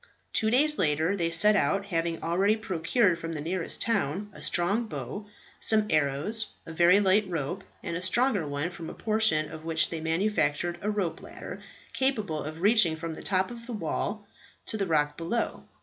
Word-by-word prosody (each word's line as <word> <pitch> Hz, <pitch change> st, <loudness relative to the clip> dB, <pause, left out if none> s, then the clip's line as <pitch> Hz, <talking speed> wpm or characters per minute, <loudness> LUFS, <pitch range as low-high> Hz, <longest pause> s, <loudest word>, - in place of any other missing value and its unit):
Two 220 Hz, -, +2 dB
days 300 Hz, +6 st, +4 dB
later 160 Hz, +3 st, +2 dB
they 170 Hz, -4 st, 0 dB
set 185 Hz, +6 st, +5 dB
out, 195 Hz, +3 st, +1 dB
having 165 Hz, -3 st, -2 dB
already 190 Hz, +6 st, +2 dB
procured 185 Hz, -1 st, +1 dB
from 165 Hz, 0 st, -5 dB
the 155 Hz, -, -4 dB
nearest 170 Hz, +3 st, -2 dB
town 205 Hz, -2 st, -1 dB
a -, -, -12 dB
strong 200 Hz, +7 st, +1 dB
bow, 210 Hz, -1 st, -6 dB, 0.3 s
some 215 Hz, -1 st, +2 dB
arrows, 155 Hz, +9 st, +1 dB, 0.2 s
a 165 Hz, -, -8 dB
very 175 Hz, +4 st, +5 dB
light 200 Hz, 0 st, +3 dB
rope, 170 Hz, +3 st, -3 dB, 0.2 s
and 170 Hz, -3 st, -3 dB
a 175 Hz, -, -3 dB
stronger 200 Hz, -, +1 dB
one 145 Hz, +4 st, -2 dB
from 165 Hz, -2 st, -8 dB
a -, -, -8 dB
portion 215 Hz, -8 st, +1 dB
of 160 Hz, 0 st, -8 dB
which 160 Hz, -1 st, +1 dB
they 165 Hz, -2 st, -4 dB
manufactured 170 Hz, -1 st, 0 dB
a 210 Hz, -, -1 dB
rope 200 Hz, -6 st, -2 dB
ladder -, -, -9 dB, 0.3 s
capable 215 Hz, -, 0 dB
of 155 Hz, +3 st, -6 dB
reaching 205 Hz, -6 st, +5 dB
from 165 Hz, 0 st, -5 dB
the -, -, -8 dB
top 190 Hz, +2 st, +1 dB
of 235 Hz, -1 st, -10 dB
the 245 Hz, -, -5 dB
wall 205 Hz, +2 st, -3 dB, 0.4 s
to -, -, -2 dB
the 200 Hz, -3 st, -1 dB
rock 150 Hz, -2 st, +1 dB
below. 170 Hz, +8 st, -2 dB
180 Hz, 185 wpm, -28 LUFS, 160-210 Hz, 0.4 s, set